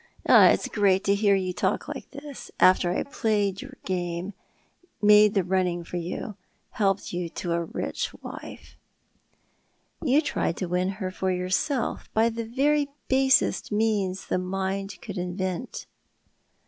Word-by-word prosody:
" -, -, -31 dB
It's -, -, +6 dB
a -, -, -5 dB
treat 195 Hz, -2 st, +2 dB
to 200 Hz, -, +3 dB
hear 200 Hz, 0 st, +3 dB
you 185 Hz, -1 st, -1 dB
talk -, -, -1 dB
like -, -, -7 dB
this, 285 Hz, -1 st, -9 dB
after 185 Hz, -1 st, +5 dB
I 175 Hz, -, 0 dB
played 210 Hz, -8 st, -1 dB
your 270 Hz, 0 st, -10 dB
game, 180 Hz, +1 st, -3 dB, 0.7 s
made 210 Hz, 0 st, +6 dB
the 195 Hz, -, +3 dB
running 180 Hz, -1 st, 0 dB
for 175 Hz, -, -6 dB
you, 180 Hz, +4 st, -5 dB, 0.3 s
helped 195 Hz, -3 st, 0 dB
you 175 Hz, -1 st, -3 dB
to 175 Hz, +1 st, -5 dB
a 170 Hz, 0 st, 0 dB
rich -, -, -3 dB
wife." -, -, -10 dB, 0.6 s
" -, -, -43 dB
You 280 Hz, -1 st, +4 dB
tried 170 Hz, -, -1 dB
to 185 Hz, -, -2 dB
win 180 Hz, +1 st, 0 dB
her 185 Hz, -3 st, -3 dB
for 190 Hz, 0 st, -2 dB
yourself 185 Hz, +8 st, -1 dB
by 225 Hz, +1 st, +4 dB
the 230 Hz, 0 st, -4 dB
very 285 Hz, +5 st, +1 dB, 0.2 s
basest 265 Hz, -2 st, +3 dB
means 205 Hz, -3 st, 0 dB
the -, -, 0 dB
human 185 Hz, 0 st, -4 dB
mind 195 Hz, +1 st, -3 dB
could 200 Hz, -4 st, -5 dB
invent." 185 Hz, +4 st, -4 dB
195 Hz, 160 wpm, -26 LUFS, 180-220 Hz, 0.7 s, It's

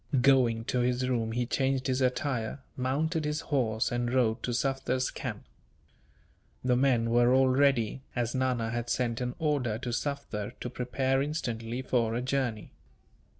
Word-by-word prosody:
Going 125 Hz, -4 st, +4 dB
to 125 Hz, -, 0 dB
his 125 Hz, +1 st, +1 dB
room 115 Hz, -3 st, 0 dB
he 120 Hz, +1 st, 0 dB
changed 135 Hz, +1 st, 0 dB
his 130 Hz, 0 st, 0 dB
attire, 125 Hz, -2 st, 0 dB, 0.2 s
mounted 155 Hz, +6 st, 0 dB
his 150 Hz, +1 st, -1 dB
horse, 115 Hz, -7 st, 0 dB
and 120 Hz, 0 st, -1 dB
rode 120 Hz, -3 st, +2 dB
to 125 Hz, -, -2 dB
Sufder's 130 Hz, 0 st, 0 dB
camp. -, -, -6 dB, 1.2 s
The 125 Hz, -1 st, +3 dB
men 120 Hz, -3 st, +2 dB
were 120 Hz, +1 st, +4 dB
all 130 Hz, 0 st, +5 dB
ready, 130 Hz, -3 st, +2 dB
as 120 Hz, -2 st, -1 dB
Nana 125 Hz, -3 st, 0 dB
had 120 Hz, 0 st, -3 dB
sent 120 Hz, -1 st, 0 dB
an 125 Hz, 0 st, -2 dB
order 145 Hz, -9 st, 0 dB
to 125 Hz, +1 st, -5 dB
Sufder 130 Hz, -6 st, -3 dB
to 125 Hz, -, -4 dB
prepare 130 Hz, +2 st, 0 dB
instantly 120 Hz, -5 st, -3 dB
for 115 Hz, -3 st, +1 dB
a 120 Hz, -, -1 dB
journey. 130 Hz, -5 st, -2 dB
125 Hz, 155 wpm, -29 LUFS, 120-135 Hz, 1.2 s, all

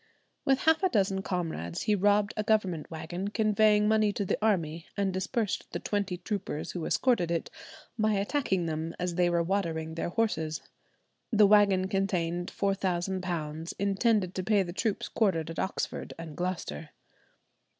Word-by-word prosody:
With 270 Hz, -1 st, +3 dB
half 320 Hz, +2 st, +4 dB
a 375 Hz, -, +3 dB
dozen 195 Hz, -, +1 dB
comrades 165 Hz, -, -3 dB
he 210 Hz, -, +2 dB
robbed 205 Hz, +1 st, +3 dB
a 215 Hz, -, 0 dB
government 200 Hz, -7 st, 0 dB
wagon 170 Hz, +4 st, -5 dB
conveying 210 Hz, 0 st, +3 dB
money 215 Hz, -1 st, +3 dB
to 200 Hz, -, -2 dB
the 195 Hz, -, -1 dB
army, 170 Hz, -7 st, 0 dB
and 195 Hz, -2 st, +1 dB
dispersed 190 Hz, +3 st, -2 dB
the -, -, -2 dB
twenty 200 Hz, -3 st, -2 dB
troopers 180 Hz, -4 st, -4 dB
who 175 Hz, -3 st, -4 dB
escorted 230 Hz, -10 st, +2 dB
it, 170 Hz, -1 st, -2 dB, 0.5 s
by 215 Hz, 0 st, +3 dB
attacking 195 Hz, -, 0 dB
them 160 Hz, +1 st, -3 dB
as 180 Hz, -1 st, -2 dB
they 175 Hz, 0 st, +2 dB
were 170 Hz, -1 st, +2 dB
watering 165 Hz, -4 st, -1 dB
their 165 Hz, -, -2 dB
horses. 160 Hz, -7 st, -1 dB, 0.7 s
The 215 Hz, -2 st, +6 dB
wagon 200 Hz, -2 st, +5 dB
contained 180 Hz, -3 st, -1 dB
£4,000, 180 Hz, -4 st, -2 dB
intended 200 Hz, -1 st, +1 dB
to 185 Hz, -, -3 dB
pay 205 Hz, -1 st, +3 dB
the 175 Hz, -1 st, -6 dB
troops 215 Hz, +2 st, -1 dB
quartered 165 Hz, -7 st, 0 dB
at 165 Hz, -, -6 dB
Oxford 190 Hz, -, -3 dB
and 165 Hz, -2 st, -8 dB
Gloucester. 175 Hz, -, -4 dB
190 Hz, 155 wpm, -29 LUFS, 170-210 Hz, 0.7 s, The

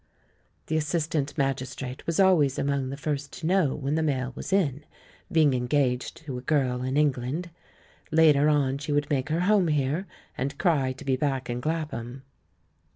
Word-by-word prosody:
The 160 Hz, -, 0 dB
assistant 155 Hz, -1 st, -1 dB
magistrate 135 Hz, -1 st, -3 dB
was 165 Hz, +1 st, 0 dB
always 165 Hz, -8 st, +4 dB
among 140 Hz, -2 st, 0 dB
the 135 Hz, -, -5 dB
first 145 Hz, -1 st, -3 dB
to 160 Hz, -, -7 dB
know 175 Hz, -5 st, +2 dB
Vv^hen 140 Hz, +3 st, 0 dB
the 160 Hz, -, +1 dB
mail 130 Hz, -4 st, -1 dB
was -, -, -6 dB
in, 150 Hz, -8 st, +1 dB, 0.5 s
being 155 Hz, -5 st, +4 dB
engaged 125 Hz, 0 st, 0 dB
to 130 Hz, -4 st, -4 dB
a -, -, -9 dB
girl 130 Hz, -3 st, 0 dB
in 130 Hz, +2 st, -1 dB
England. 150 Hz, +4 st, 0 dB, 0.6 s
Later 155 Hz, -2 st, +5 dB
on 140 Hz, -2 st, +1 dB
she 150 Hz, +1 st, -4 dB
would 145 Hz, 0 st, 0 dB
make 140 Hz, 0 st, 0 dB
her 160 Hz, +3 st, 0 dB
home 195 Hz, -1 st, +3 dB
here, 150 Hz, +5 st, 0 dB, 0.3 s
and 140 Hz, +2 st, -3 dB
cry 145 Hz, -7 st, +2 dB
to 130 Hz, +2 st, -10 dB
be 130 Hz, -1 st, +1 dB
back 135 Hz, -3 st, -1 dB
in 120 Hz, +1 st, -3 dB
Clapham. 135 Hz, -5 st, -4 dB
145 Hz, 170 wpm, -26 LUFS, 130-155 Hz, 0.6 s, Later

